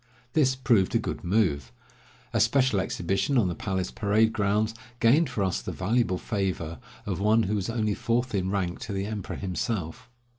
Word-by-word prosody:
This 130 Hz, -4 st, +3 dB
proved 115 Hz, -7 st, +2 dB
a -, -, +7 dB
good -, -, -4 dB
move. 85 Hz, -, +1 dB, 0.6 s
A 115 Hz, -, +2 dB
special 120 Hz, 0 st, +3 dB
exhibition 95 Hz, +8 st, 0 dB
on 105 Hz, -7 st, +3 dB
the -, -, -2 dB
palace 95 Hz, +1 st, -3 dB
parade 110 Hz, +2 st, +2 dB
grounds 105 Hz, +1 st, +1 dB, 0.3 s
gained 135 Hz, +6 st, +4 dB
for 115 Hz, -6 st, -1 dB
us 90 Hz, -10 st, 0 dB
the -, -, -5 dB
valuable 105 Hz, 0 st, 0 dB
favor 95 Hz, -7 st, -3 dB, 0.3 s
of 95 Hz, -4 st, -2 dB
one 110 Hz, +3 st, +4 dB
who 105 Hz, +1 st, -1 dB
was 100 Hz, 0 st, -1 dB
only 110 Hz, -2 st, 0 dB
fourth 120 Hz, +4 st, -1 dB
in 95 Hz, -2 st, 0 dB
rank 95 Hz, -3 st, -1 dB
to 115 Hz, -5 st, -5 dB
the 95 Hz, 0 st, -2 dB
emperor 105 Hz, -2 st, -5 dB
himself. 95 Hz, +1 st, -3 dB
105 Hz, 180 wpm, -27 LUFS, 95-115 Hz, 0.6 s, a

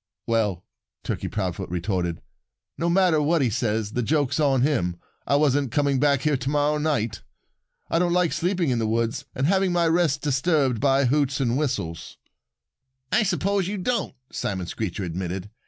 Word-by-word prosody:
"Well," 105 Hz, -6 st, 0 dB, 0.4 s
Turkey -, -, -3 dB
Proudfoot -, -, -3 dB
retorted, 90 Hz, -1 st, -2 dB, 0.5 s
"no 170 Hz, +2 st, -1 dB
matter 175 Hz, -3 st, +3 dB
what 155 Hz, 0 st, +2 dB
he 120 Hz, -, +1 dB
says, 110 Hz, -2 st, -1 dB
the 125 Hz, -, -1 dB
joke's 145 Hz, +3 st, 0 dB
on 135 Hz, -4 st, +3 dB
him. 95 Hz, -, +1 dB, 0.3 s
I 140 Hz, -, +3 dB
wasn't 145 Hz, -3 st, +2 dB
coming 140 Hz, -2 st, +1 dB
back 140 Hz, -1 st, +3 dB
here 150 Hz, -2 st, +1 dB
to 135 Hz, +1 st, -3 dB
morrow 150 Hz, +1 st, +1 dB
night. 115 Hz, -9 st, -1 dB, 0.7 s
I 165 Hz, -, +1 dB
don't 175 Hz, 0 st, +2 dB
like 175 Hz, -4 st, +2 dB
sleeping 170 Hz, -1 st, 0 dB
in 120 Hz, -, 0 dB
the 110 Hz, -, 0 dB
woods 115 Hz, +1 st, -1 dB
and 130 Hz, -, 0 dB
having 190 Hz, +2 st, +2 dB
my 170 Hz, -1 st, +2 dB
rest 160 Hz, -4 st, +1 dB
disturbed 140 Hz, -3 st, +1 dB
by 135 Hz, 0 st, +3 dB
hoots 140 Hz, +1 st, +1 dB
and 120 Hz, -3 st, +1 dB
whistles." 125 Hz, -, -3 dB, 0.9 s
"I -, -, +4 dB
suppose 195 Hz, -1 st, 0 dB
you 205 Hz, +1 st, -3 dB
don't," 235 Hz, +6 st, -1 dB, 0.2 s
Simon 95 Hz, -3 st, -3 dB
Screecher 100 Hz, +1 st, -4 dB
admitted. 90 Hz, +3 st, -4 dB
140 Hz, 170 wpm, -24 LUFS, 115-160 Hz, 0.9 s, I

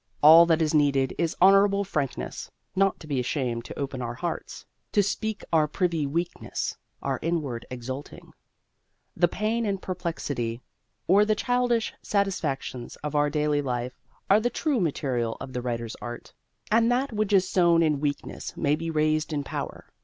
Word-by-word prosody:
All 165 Hz, +3 st, +9 dB
that 165 Hz, -1 st, +3 dB
is 155 Hz, -, 0 dB
needed 140 Hz, -3 st, +3 dB
is 165 Hz, -2 st, 0 dB
honourable 195 Hz, +2 st, +5 dB
frankness: 145 Hz, -9 st, -3 dB, 0.3 s
not 195 Hz, 0 st, +2 dB
to -, -, -9 dB
be 145 Hz, -4 st, -1 dB
ashamed 120 Hz, -2 st, -2 dB
to -, -, -8 dB
open 135 Hz, -2 st, -3 dB
our 120 Hz, 0 st, -4 dB
hearts, 170 Hz, +7 st, -5 dB, 0.3 s
to 205 Hz, -, +4 dB
speak 215 Hz, +1 st, -2 dB
our 155 Hz, -2 st, +4 dB
privy 165 Hz, -2 st, 0 dB
weakness, 170 Hz, +5 st, -3 dB, 0.3 s
our -, -, -1 dB
inward 150 Hz, -8 st, -2 dB
exulting. 130 Hz, +3 st, -7 dB
Then -, -, -30 dB, 0.8 s
the 175 Hz, -, +4 dB
pain 215 Hz, +6 st, -1 dB
and 200 Hz, -3 st, -1 dB
perplexity, 145 Hz, -11 st, -3 dB, 0.4 s
or 195 Hz, +4 st, +5 dB
the 215 Hz, 0 st, +2 dB
childish 245 Hz, 0 st, +1 dB
satisfactions, 150 Hz, -, -2 dB
of 150 Hz, 0 st, -3 dB
our 145 Hz, 0 st, +3 dB
daily 150 Hz, -1 st, +1 dB
life 125 Hz, -2 st, -3 dB, 0.3 s
are 200 Hz, +2 st, +6 dB
the 240 Hz, +2 st, 0 dB
true 290 Hz, -1 st, 0 dB
material 130 Hz, -, -1 dB
of 130 Hz, 0 st, -8 dB
the 125 Hz, -, -2 dB
writer's 115 Hz, -2 st, -3 dB
art, 120 Hz, 0 st, -7 dB, 0.4 s
and 230 Hz, +2 st, +4 dB
that 255 Hz, +1 st, 0 dB
which 215 Hz, -1 st, 0 dB
is 190 Hz, -2 st, +4 dB
sown 170 Hz, -3 st, +4 dB
in 150 Hz, -3 st, +2 dB
weakness 145 Hz, -1 st, -4 dB
may 145 Hz, -2 st, +2 dB
be 165 Hz, +1 st, -4 dB
raised 155 Hz, 0 st, +1 dB
in 145 Hz, -2 st, -1 dB
power. -, -, -5 dB
155 Hz, 170 wpm, -26 LUFS, 135-195 Hz, 0.8 s, All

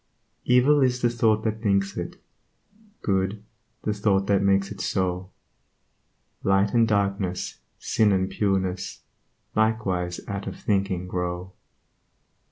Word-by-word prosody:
Evil 130 Hz, +4 st, +5 dB
is 125 Hz, -1 st, +2 dB
the 120 Hz, -, +4 dB
thought 110 Hz, -2 st, +2 dB
that 110 Hz, 0 st, -2 dB
thinks 100 Hz, -2 st, +1 dB
it; -, -, -5 dB, 0.8 s
Good, 100 Hz, +1 st, 0 dB, 0.4 s
the 105 Hz, -, 0 dB
thought 100 Hz, -2 st, +1 dB
that 100 Hz, -1 st, +2 dB
makes 100 Hz, 0 st, +2 dB
it -, -, -6 dB
so 90 Hz, -1 st, -1 dB, 1.1 s
Light 95 Hz, +1 st, +2 dB
and 115 Hz, -1 st, +4 dB
darkness, 100 Hz, -3 st, -1 dB, 0.2 s
sin 110 Hz, -2 st, +2 dB
and 95 Hz, -1 st, +2 dB
pureness 95 Hz, -2 st, -1 dB, 0.5 s
Likewise 100 Hz, -6 st, 0 dB
out 100 Hz, -1 st, -4 dB
of -, -, -6 dB
thinking 95 Hz, -3 st, 0 dB
grow. 90 Hz, 0 st, -3 dB
100 Hz, 120 wpm, -25 LUFS, 95-110 Hz, 1.1 s, Evil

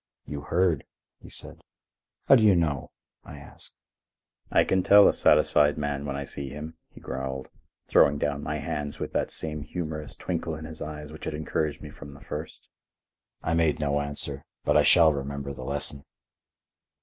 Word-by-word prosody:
"You 75 Hz, -1 st, -5 dB
heard," 85 Hz, -1 st, +1 dB, 0.4 s
he -, -, -12 dB
said. -, -, -6 dB, 0.7 s
"How -, -, +9 dB
do 120 Hz, -, +4 dB
you 105 Hz, -3 st, +6 dB
know?" 75 Hz, -5 st, 0 dB, 0.3 s
I 75 Hz, -, -10 dB
asked. 70 Hz, -, -10 dB, 0.7 s
"I -, -, +4 dB
can 95 Hz, -, +2 dB
tell 100 Hz, +2 st, +8 dB
a -, -, +4 dB
satisfied 75 Hz, 0 st, +4 dB
man 70 Hz, -1 st, -2 dB
when 70 Hz, -, -3 dB
I 70 Hz, -, -3 dB
see 70 Hz, 0 st, -7 dB
him," 75 Hz, +3 st, -7 dB
he -, -, -15 dB
growled, 65 Hz, 0 st, -5 dB, 0.4 s
throwing 70 Hz, -, +5 dB
down 70 Hz, 0 st, -1 dB
my 75 Hz, +1 st, -3 dB
hands 75 Hz, 0 st, -4 dB
with -, -, -4 dB
that -, -, 0 dB
same 75 Hz, -1 st, -5 dB
humorous 75 Hz, 0 st, -5 dB
twinkle 85 Hz, -2 st, -3 dB
in 80 Hz, +1 st, -8 dB
his 80 Hz, 0 st, -10 dB
eyes 75 Hz, -1 st, -6 dB
which 80 Hz, -, -9 dB
had 75 Hz, -, -3 dB
encouraged 75 Hz, -1 st, -2 dB
me 75 Hz, -, -8 dB
from 70 Hz, 0 st, -11 dB
the 70 Hz, -, -14 dB
first. 75 Hz, +2 st, -7 dB, 0.8 s
I 80 Hz, -, 0 dB
made 80 Hz, -2 st, +2 dB
no 75 Hz, -1 st, +1 dB
answer, 70 Hz, -1 st, -3 dB, 0.2 s
but -, -, +3 dB
I -, -, +7 dB
shall 80 Hz, -3 st, +6 dB
remember 70 Hz, 0 st, -4 dB
the 65 Hz, -1 st, -8 dB
lesson. 70 Hz, 0 st, 0 dB
75 Hz, 180 wpm, -27 LUFS, 70-80 Hz, 0.8 s, How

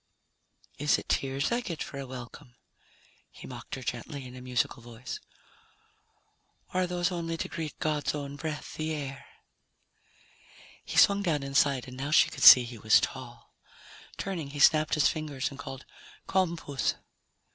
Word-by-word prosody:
"Is 150 Hz, +1 st, +3 dB
it -, -, -8 dB
tears 135 Hz, 0 st, 0 dB
I 240 Hz, +1 st, +1 dB
get 170 Hz, -9 st, -4 dB
for 140 Hz, -, -8 dB
a 135 Hz, -, -6 dB
welcome?" 125 Hz, 0 st, -10 dB, 0.7 s
he -, -, -13 dB
mocked -, -, -7 dB
her 130 Hz, -, -8 dB
gently 125 Hz, +3 st, -5 dB
in 125 Hz, 0 st, -10 dB
a 125 Hz, -, -9 dB
musical 125 Hz, 0 st, -1 dB
voice. 120 Hz, +1 st, -8 dB, 1.5 s
"Or 185 Hz, -, +2 dB
are 180 Hz, -, +1 dB
those 175 Hz, +1 st, 0 dB
only 165 Hz, -2 st, -3 dB
to -, -, -3 dB
greet 160 Hz, -2 st, -6 dB
God's 150 Hz, -2 st, -1 dB
own 140 Hz, -1 st, -5 dB
breath, 155 Hz, 0 st, -5 dB
the 155 Hz, 0 st, -3 dB
air?" 140 Hz, -1 st, -6 dB, 1.6 s
He -, -, -5 dB
swung 200 Hz, 0 st, +6 dB
down 160 Hz, -7 st, 0 dB
inside 140 Hz, -1 st, +1 dB
and 125 Hz, 0 st, -10 dB
now 140 Hz, +2 st, -3 dB
she 155 Hz, -, +5 dB
could -, -, -8 dB
see 125 Hz, -, +11 dB
he 120 Hz, -1 st, -8 dB
was 110 Hz, +1 st, +5 dB
tall. -, -, -6 dB, 0.6 s
Turning, 170 Hz, -7 st, -4 dB
he 145 Hz, +1 st, -7 dB
snapped 155 Hz, +2 st, +5 dB
his 150 Hz, -, +4 dB
fingers 150 Hz, -4 st, -3 dB
and 140 Hz, -, -11 dB
called, 135 Hz, -2 st, -8 dB, 0.4 s
"Come, 180 Hz, -3 st, +1 dB
puss." 140 Hz, -4 st, -2 dB
145 Hz, 165 wpm, -29 LUFS, 130-160 Hz, 1.6 s, see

